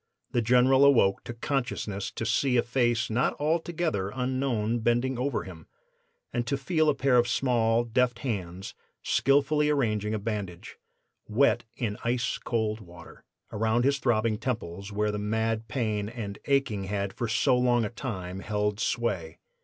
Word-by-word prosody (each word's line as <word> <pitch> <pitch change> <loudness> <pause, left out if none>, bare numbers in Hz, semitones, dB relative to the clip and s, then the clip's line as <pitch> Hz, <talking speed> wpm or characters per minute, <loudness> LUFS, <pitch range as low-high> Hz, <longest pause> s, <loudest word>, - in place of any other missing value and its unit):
The 120 - +1
General 125 +4 +5
awoke 120 -9 +4
to 120 - -5
consciousness 115 -6 -2
to 115 - -4
see 125 +3 +2
a 120 - +3
face 120 -2 +1
not 120 +4 +1
altogether 160 - 0
unknown 125 -3 0
bending 120 +3 +1
over 135 0 -1
him, 85 -4 -11 0.7
and 120 -1 -1
to 140 - 0
feel 155 +2 +1
a 145 - +2
pair 135 -2 +3
of 120 0 +4
small, 120 -2 +2
deft 120 +1 +1
hands 95 -5 -4 0.3
skillfully 145 +2 +2
arranging 110 -7 0
a - - 0
bandage, 100 -5 -5 0.5
wet 120 +1 +2
in 105 -4 -2
ice 120 +1 0
cold 110 -2 -1
water, 85 -3 -14 0.3
around 110 +3 +1
his 140 0 +2
throbbing 115 -4 +1
temples, 100 -6 -4
where 105 +1 0
the 105 - -3
mad 110 +1 -1
pain 105 -3 -1
and 110 -4 -6
aching 135 -8 +1
had 100 0 -2
for 120 - -3
so 125 +4 +3
long 120 -2 +2
a - - -3
time 95 -8 -5
held 105 0 -1
sway. 90 -12 -1
115 Hz, 155 wpm, -28 LUFS, 105-130 Hz, 0.7 s, General